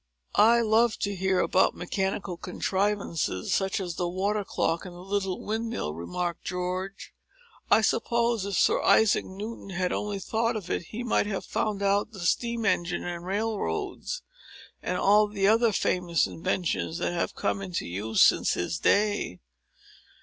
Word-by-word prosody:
"I 235 +2 +5
love 225 0 +3
to 200 - 0
hear 190 0 +1
about 190 - +3
mechanical 190 +1 -2
contrivances—such 190 - -1
as 180 -3 -3
the 175 -1 -1
water 200 +3 -1
clock 165 -3 -1
and 180 -2 -9
the - - -11
little 195 -1 -2
windmill," 225 - -3
remarked 130 - -4
George. 185 +2 -4 0.6
"I 220 - +6
suppose 235 -1 +1
if 200 -1 -3
Sir - - +3
Isaac 220 -2 +4
Newton 205 +2 -7
had 180 -1 -1
only 205 -1 -2
thought 230 +4 -1
of 205 -5 -5
it, - - -1
he 225 +7 -6
might 235 -3 +1
have 195 -2 -3
found 205 -2 -1
out 200 +3 +1
the 195 - -8
steam 235 +6 0
engine, 175 -3 0
and 175 0 -5
railroads, 225 - -2 0.6
and 180 - -2
all 210 +2 +5
the 200 -2 0
other 225 +2 +4
famous 180 -3 +1
inventions 170 -1 -2
that - - -1
have 170 - -2
come 195 - -1
into 185 -3 -3
use 105 +5 +2
since - - +4
his 160 - -2
day." 205 - +1
195 Hz, 155 wpm, -27 LUFS, 180-215 Hz, 0.6 s, I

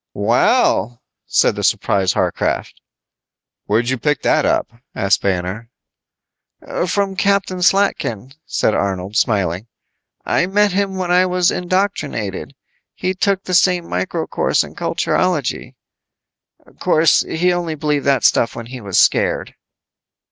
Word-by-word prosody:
"Well," 115 +5 +2 0.3
said - - +2
the - - -4
surprised 95 -2 +1
Warcraft. - - -2 0.8
"Where'd 115 +4 0
you 130 -2 -1
pick 150 +2 -1
that - - +2
up," - - 0 0.2
asked 100 0 +1
Banner. 95 +4 -2 1.2
"From 195 +1 -1
Captain 195 -2 0
Slatkin," 155 - +1
said 110 - 0
Arnold, 95 +1 -2
smiling. 100 -2 0 0.6
"I 180 - +1
met 205 +1 +2
him 195 +1 -1
when 185 -2 -2
I 180 +1 +4
was 180 -1 +2
indoctrinated. 175 - -2 0.4
He 185 0 -2
took 195 +1 0
the 185 - -5
same 180 -1 +3
micro 90 +1 -2
course - - 0
in - - -11
culturology. 175 -8 -1 1.0
'Course, 160 +1 +3
he 180 +3 0
only 170 -3 -3
believed 150 -1 -1
that 135 -3 +2
stuff 115 - +2
when 115 - -7
he 125 - -7
was 100 -3 -2
scared." - - +2
155 Hz, 125 wpm, -18 LUFS, -, 1.2 s, I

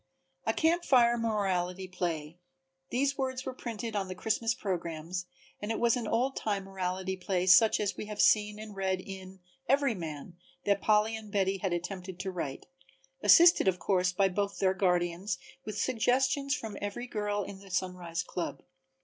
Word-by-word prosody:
A - - +3
Camp 335 +2 +2
Fire 240 -5 +5
Morality 190 -5 -1
Play: 170 -3 -3 0.5
These 275 +3 0
words 260 -1 -2
were 260 - -3
printed 230 -3 -5
on 195 -2 -1
the 185 - -6
Christmas 225 +4 0
programs 175 -1 -4 0.3
and 205 - -4
it 225 - -1
was 235 -1 +3
an 240 -3 -3
old 250 +5 +1
time 200 -2 -1
morality 190 0 -3
play 185 0 -1
such 215 +4 +6
as 205 -2 -1
we 210 - -6
have 210 -1 -7
seen 210 -1 +4
and 215 -1 -9
read 190 -1 0
in 190 0 -9 0.3
"Everyman" 180 - 0 0.3
that 200 -1 +2
Polly 215 +1 +3
and 215 -2 -9
Betty 195 -1 +1
had 190 -1 -1
attempted 180 +1 -4
to 190 - -3
write, 155 -7 -5 0.6
assisted 340 - +7
of 185 -1 +3
course 185 -1 +1
by 195 +2 +3
both 200 +2 -2
their 190 -1 +2
guardians 180 0 0
and - - -21
with 215 -1 -5
suggestions 265 +4 +1
from 220 -6 -6
every 205 +4 -4
girl 205 -3 -2
in 195 0 -8
the 195 0 -14
Sunrise 180 -2 -2
club. 175 -1 -5
195 Hz, 175 wpm, -30 LUFS, 185-225 Hz, 0.6 s, assisted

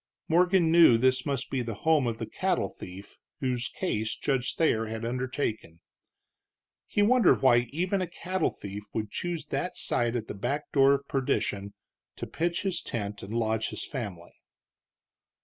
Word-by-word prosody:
Morgan 175 0 +4
knew 165 -8 +7
this 130 +2 +2
must 140 -3 -2
be 135 - 0
the 115 -3 -4
home 155 -5 +4
of 115 -1 -2
the - - -4
cattle - - -1
thief 95 +2 -11 0.2
whose 125 -2 -1
case 110 - -2
Judge 135 -3 -1
Thayer 115 -9 +2
had 110 +1 -4
undertaken. 120 - -3 1.1
He 205 - +2
wondered 230 - +4
why 120 -2 +5
even 185 +5 0
a 185 - -1
cattle 185 +3 -1
thief 100 0 -7
would 110 -2 -2
choose 175 -2 -3
that 180 - -2
site 120 0 0
at 115 -2 -3
the - - -5
back 135 +9 -3
door 135 0 +5
of 140 0 -6
perdition 100 -6 -1 0.4
to - - -5
pitch 170 +2 -2
his 190 -3 0
tent 105 -2 -4
and 100 - -8
lodge 110 -1 0
his - - -5
family. 100 - -6
130 Hz, 165 wpm, -28 LUFS, 110-165 Hz, 1.1 s, knew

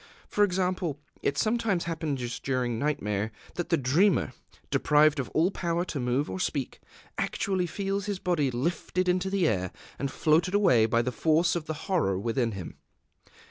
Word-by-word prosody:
For 210 - +2
example, 180 -5 0 0.2
it 140 - 0
sometimes 215 -3 +1
happens 150 -7 -3
during 125 -3 -1
nightmare 110 -8 -1 0.2
that 175 -1 -4
the 170 - +3
dreamer, 160 +9 +2 0.4
deprived 150 0 +4
of 130 - -3
all 170 +5 +2
power 170 -2 -1
to 160 -5 -4
move 125 +3 0
or - - -5
speak, 140 -7 -2 0.4
actually 185 -3 0
feels 195 +2 -2
his 205 -2 -1
body 170 -7 +1
lifted 170 +8 -1
into 180 +1 +1
the 190 -3 +2
air 95 - 0 0.3
and 140 - -1
floated 165 +7 +2
away 125 - +5
by 115 +1 +2
the 125 - -1
force 160 +6 +2
of 170 -3 -3
the 155 - -3
horror 165 - +1
within 115 +2 -1
him. 95 -4 -7
155 Hz, 165 wpm, -28 LUFS, 125-180 Hz, 0.4 s, away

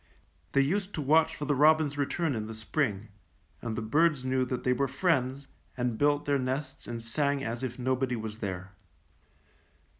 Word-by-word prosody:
'^ - - -36 0.5
They 140 - +5
used 190 +8 0
to 155 - -2
watch 155 +4 +4
for 145 - -4
the 145 - +2
robins' 150 +1 +4
return 145 +2 0
in 110 -2 -3
the 110 - -7
spring, 110 -2 -1 0.5
and 115 -2 -3
the 115 - -3
birds 150 +3 +2
knew 130 0 +1
that 125 -1 -3
they 125 - +3
were 140 +2 +1
friends, 135 -2 0 0.3
and 125 -2 0
built 145 +3 +2
their 140 -1 +2
nests 130 +3 -3
and 115 -1 -5
sang 140 +4 0
as 115 0 -3
if 125 -2 -4
nobody 130 0 0
was 110 -1 -6
there. 95 -2 -4
130 Hz, 185 wpm, -29 LUFS, 115-145 Hz, 0.5 s, They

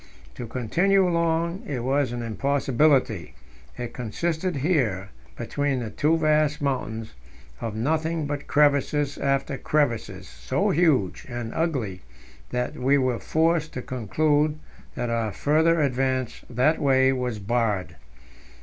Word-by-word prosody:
To 120 - -7
continue 180 - +2
along 170 +1 0
it 125 -5 -3
was 135 0 +1
an 120 -1 -4
impossibility; 130 - +1 0.4
it 120 -1 -5
consisted 160 - -2
here 130 - 0 0.3
between 140 +3 -1
the 115 -3 -5
two 155 +9 +2
vast 155 -1 +2
mountains 115 -6 -3 0.5
of 115 -2 -4
nothing 155 +6 0
but 145 0 -4
crevasse 145 0 +2
after 135 -1 0
crevasse, 145 -7 -1
so 65 +1 -1
huge 145 - +1
and 120 -2 -5
ugly 125 - -2 0.5
that 125 0 -2
we 135 +3 +3
were 130 -4 0
forced 160 0 +1
to 125 - -5
conclude 150 +5 +1 0.4
that 120 -1 -2
our 115 -2 0
further 160 - +2
advance 130 -3 0
that 130 +6 +2
way 130 -1 +4
was 125 -3 -2
barred. 105 -5 -1
135 Hz, 125 wpm, -25 LUFS, 120-155 Hz, 0.5 s, way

